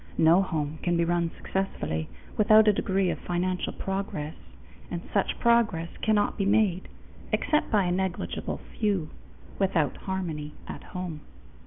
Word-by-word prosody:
No 165 Hz, +4 st, +6 dB
home 155 Hz, -4 st, -2 dB
can 175 Hz, -1 st, +1 dB
be 170 Hz, -, +2 dB
run 170 Hz, 0 st, +1 dB
successfully 80 Hz, -, -2 dB, 0.3 s
without 215 Hz, +1 st, +6 dB
a 210 Hz, -, +7 dB
degree 195 Hz, -1 st, +1 dB
of -, -, -4 dB
financial 180 Hz, +1 st, -1 dB
progress, 190 Hz, -6 st, -3 dB, 0.6 s
and -, -, -3 dB
such -, -, +1 dB
progress 225 Hz, -9 st, +3 dB
cannot 215 Hz, -1 st, +2 dB
be 195 Hz, -, +2 dB
made 200 Hz, -3 st, +2 dB, 0.4 s
except 300 Hz, -, +1 dB
by 210 Hz, -3 st, +3 dB
a 175 Hz, -, 0 dB
negligible 185 Hz, 0 st, -2 dB, 0.2 s
few 195 Hz, -8 st, +1 dB, 0.5 s
without 170 Hz, -8 st, +2 dB
harmony 165 Hz, -6 st, -4 dB
at -, -, -7 dB
home. 180 Hz, -4 st, -6 dB
185 Hz, 140 wpm, -27 LUFS, 165-200 Hz, 0.6 s, a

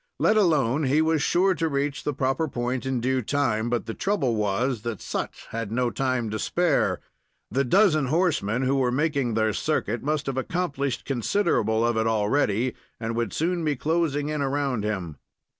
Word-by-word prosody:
Let 215 Hz, -, +3 dB
alone, 155 Hz, -, +2 dB
he 140 Hz, +4 st, +3 dB
was 160 Hz, -1 st, +2 dB
sure 185 Hz, +6 st, +3 dB
to 165 Hz, -2 st, -1 dB
reach 140 Hz, -2 st, -2 dB
the 150 Hz, -, -1 dB
proper 135 Hz, +4 st, 0 dB
point 125 Hz, 0 st, -3 dB
in 130 Hz, -2 st, -1 dB
due 130 Hz, +1 st, +1 dB
time; 120 Hz, -3 st, 0 dB
but 120 Hz, -1 st, -1 dB
the 115 Hz, -, -4 dB
trouble 195 Hz, -, 0 dB
was 105 Hz, +4 st, 0 dB
that 115 Hz, -2 st, -4 dB
Sut -, -, -3 dB, 0.2 s
had 115 Hz, -2 st, -4 dB
no 120 Hz, +1 st, 0 dB
time 130 Hz, -3 st, -1 dB
to 110 Hz, -, -3 dB
spare. 175 Hz, -4 st, +1 dB, 0.5 s
The 135 Hz, +5 st, +2 dB
dozen 155 Hz, -, +3 dB
horsemen 135 Hz, -, +1 dB
who 135 Hz, +1 st, +2 dB
were 125 Hz, -2 st, +2 dB
making 140 Hz, -4 st, 0 dB
their 110 Hz, -1 st, +2 dB
circuit 120 Hz, -3 st, -1 dB
must 150 Hz, +1 st, -1 dB
have 135 Hz, -1 st, -3 dB
accomplished 140 Hz, -4 st, -2 dB
considerable 120 Hz, -, +1 dB
of 120 Hz, -1 st, +1 dB
it 110 Hz, 0 st, +1 dB
already, 115 Hz, +2 st, +1 dB, 0.3 s
and 115 Hz, 0 st, -3 dB
would 115 Hz, -4 st, -1 dB
soon 170 Hz, +1 st, -1 dB
be 150 Hz, -2 st, +1 dB
closing 150 Hz, 0 st, 0 dB
in 150 Hz, -1 st, -2 dB
around 135 Hz, -4 st, -1 dB
him. 95 Hz, -8 st, -3 dB
130 Hz, 180 wpm, -25 LUFS, 115-150 Hz, 0.5 s, Let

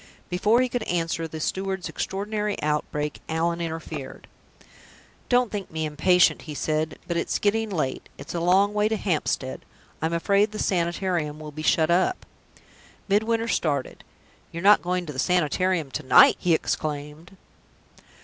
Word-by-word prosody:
Before 210 Hz, +7 st, +3 dB
he 255 Hz, -, +2 dB
could 245 Hz, 0 st, -3 dB
answer 165 Hz, -1 st, -1 dB
the 160 Hz, 0 st, -7 dB
steward's 190 Hz, +3 st, -2 dB
extraordinary 210 Hz, +1 st, -3 dB
outbreak, 150 Hz, 0 st, -2 dB
Allan 170 Hz, +1 st, 0 dB
interfered. 165 Hz, -1 st, -6 dB, 1.0 s
"Don't 245 Hz, -2 st, +3 dB
think 205 Hz, -2 st, -5 dB
me 160 Hz, 0 st, -3 dB
impatient," 175 Hz, +4 st, +3 dB
he 150 Hz, -, -5 dB
said; 155 Hz, +1 st, -1 dB
"but 170 Hz, -, -1 dB
it's 170 Hz, -, -1 dB
getting 220 Hz, +2 st, 0 dB
late; 155 Hz, -9 st, -3 dB
it's -, -, -8 dB
a 170 Hz, -, -1 dB
long 190 Hz, +4 st, +3 dB
way 210 Hz, 0 st, +2 dB
to 220 Hz, -, 0 dB
Hampstead. 155 Hz, -8 st, -2 dB, 0.4 s
I'm 160 Hz, +1 st, -1 dB
afraid 200 Hz, +5 st, +2 dB
the -, -, -5 dB
Sanitarium 170 Hz, -5 st, -1 dB
will 155 Hz, -1 st, -8 dB
be 155 Hz, +1 st, -7 dB
shut 160 Hz, +1 st, +2 dB
up." 185 Hz, -, +1 dB, 0.8 s
Midwinter 225 Hz, +3 st, +1 dB
started. 145 Hz, -, -1 dB, 0.5 s
"You -, -, -8 dB
are -, -, -9 dB
not 205 Hz, +1 st, +7 dB
going 180 Hz, 0 st, -1 dB
to 150 Hz, -, -6 dB
the 130 Hz, -, -6 dB
Sanitarium 180 Hz, -1 st, +1 dB
to -, -, -3 dB
night!" 130 Hz, -, +6 dB
he 170 Hz, -2 st, +3 dB
exclaimed. 155 Hz, +4 st, -4 dB
175 Hz, 155 wpm, -25 LUFS, 155-200 Hz, 1.0 s, not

